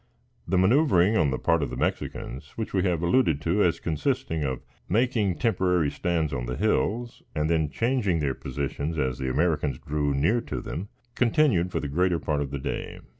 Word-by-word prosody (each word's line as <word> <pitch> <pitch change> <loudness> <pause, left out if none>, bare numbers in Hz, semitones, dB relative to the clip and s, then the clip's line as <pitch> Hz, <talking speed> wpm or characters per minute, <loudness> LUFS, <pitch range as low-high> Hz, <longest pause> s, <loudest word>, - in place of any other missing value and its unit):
The 95 - +1
manoeuvering 105 - +4
on 80 -8 +3
the 65 - -1
part 80 -1 +2
of 70 - -1
the - - -6
Mexicans, 70 +4 -3
which 110 - -4
we 95 - +2
have 85 -3 0
alluded 85 - +3
to 85 +7 +1
as 85 -2 +2
consisting 80 - -1
of 65 -3 -3 0.3
making 110 -3 +2
temporary 90 - +1
stands 80 -2 -1
on 60 -2 -3
the 60 - -3
hills, 115 +2 0
and 75 +1 0
then 80 -3 +2
changing 115 - +1
their 70 -4 0
positions 70 +4 -4
as 65 -4 -1
the 65 - -1
Americans 75 -2 +1
drew 75 0 -1
near 80 +13 +2
to - - -4
them, 95 +6 -6 0.2
continued 120 - +2
for - - -1
the 75 - -3
greater 90 +4 +1
part 75 -3 -1
of 70 - -2
the 70 - -4
day. 65 - -4
85 Hz, 190 wpm, -26 LUFS, 70-100 Hz, 0.3 s, manoeuvering